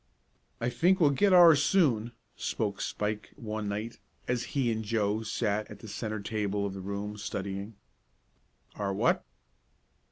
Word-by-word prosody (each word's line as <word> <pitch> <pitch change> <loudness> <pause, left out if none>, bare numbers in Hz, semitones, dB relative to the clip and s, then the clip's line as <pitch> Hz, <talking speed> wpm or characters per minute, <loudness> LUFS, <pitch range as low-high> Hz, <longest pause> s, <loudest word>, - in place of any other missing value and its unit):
"I 120 - 0
think 185 +8 +3
we'll 150 -4 +5
get 195 +8 +3
ours 170 -5 +8
soon," 125 - +2 0.2
spoke 105 -3 -2
Spike 105 0 -3
one 110 -5 -4
night, 105 +3 -4 0.3
as 125 -1 0
he 125 -4 +2
and 110 0 -2
Joe 105 -1 0
sat 110 -1 -1
at 105 - -9
the 110 - -11
centre 110 +1 -4
table 105 -1 -1
of 100 - -3
the 95 - -6
room, 100 +2 -4
studying. 100 0 -5 1.0
"Our 100 -2 -1
what?" - - +2
110 Hz, 150 wpm, -29 LUFS, 100-120 Hz, 1.0 s, ours